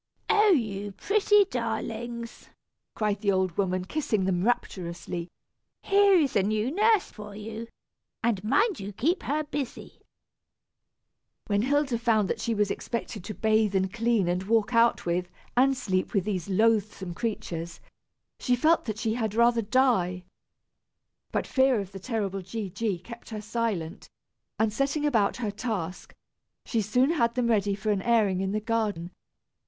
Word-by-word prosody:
"Oh! 425 0 +5
you 205 - 0
pretty 415 - +3
darlings!" 235 - -4 0.5
cried 210 -2 -1
the 200 -2 +2
old 185 -3 0
woman, 185 -2 0
kissing 215 -5 -1
them 180 -1 0
rapturously, 175 -6 -2 0.5
"here 400 0 +5
is 300 -7 +2
a 200 - +5
new 215 +5 0
nurse 425 +3 +3
for 210 -1 -10
you; 220 +2 -7 0.6
and 220 -5 +1
mind 400 - +2
you 200 +1 -6
keep 320 - 0
her 300 +2 -1
busy." 290 -3 -6 1.4
When 205 -1 +1
Hilda 270 -1 +1
found 220 -4 +2
that - - -3
she 230 -2 -1
was 205 -1 +1
expected 225 -4 -4
to 215 - -6
bathe, 220 -2 +2
and 190 0 +1
clean, 230 -4 +1
and 175 +1 0
walk 220 +4 +1
out 230 0 +3
with, 175 +1 -1 0.3
and 265 +2 +4
sleep 185 -2 -1
with 195 - +3
these 200 -3 -3
loathsome 205 -3 +1
creatures, 170 -5 -4 0.6
she 250 - +2
felt 320 +6 +3
that 215 -3 -3
she 225 -1 -1
had 220 -3 -2
rather 235 0 +4
die. 205 -6 +2 1.1
But - - -1
fear 260 -3 +3
of 195 -2 -6
the 195 - -8
terrible 200 -3 -2
G. 195 +1 -5
G. 210 -2 -1
kept 235 +7 -11
her 220 -2 -5
silent, 210 -6 -3 0.5
and 220 -1 +1
setting 280 +5 0
about 225 -9 +2
her 225 -4 -2
task, 200 -6 -4 0.5
she 230 - 0
soon 250 +8 +2
had 235 -8 +1
them 245 -2 +1
ready 205 -3 +2
for 205 +2 -1
an 200 -2 0
airing 210 -5 +2
in 190 0 -1
the 215 - 0
garden. 215 -6 -2
220 Hz, 160 wpm, -27 LUFS, 195-240 Hz, 1.4 s, Oh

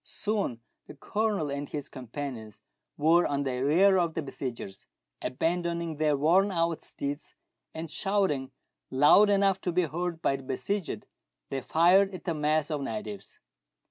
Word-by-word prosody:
Soon 205 - -2 0.3
the - - -10
Colonel 205 0 -1
and 140 0 -4
his 145 -2 -5
companions 125 -4 -7 0.4
were 165 +4 +4
on 140 0 -1
the 130 -2 -2
rear 185 +7 +5
of 170 -2 0
the 165 - -2
besiegers. 120 -8 -7 0.3
Abandoning 170 +2 -1
their 150 -2 +2
worn 180 +8 +3
out 165 -2 0
steeds, 140 +1 -6 0.4
and 160 +1 -4
shouting 190 -8 0 0.4
loud 145 +10 +6
enough 195 -1 +3
to 180 - -1
be 180 +1 +2
heard 170 +1 -3
by 135 -4 +1
the - - -10
besieged, 195 +9 -3 0.5
they 135 -1 -2
fired 185 +7 +4
at - - -9
the 170 - -1
mass 155 0 0
of 150 -2 -1
natives. 110 -5 -6
155 Hz, 150 wpm, -28 LUFS, 140-180 Hz, 0.5 s, loud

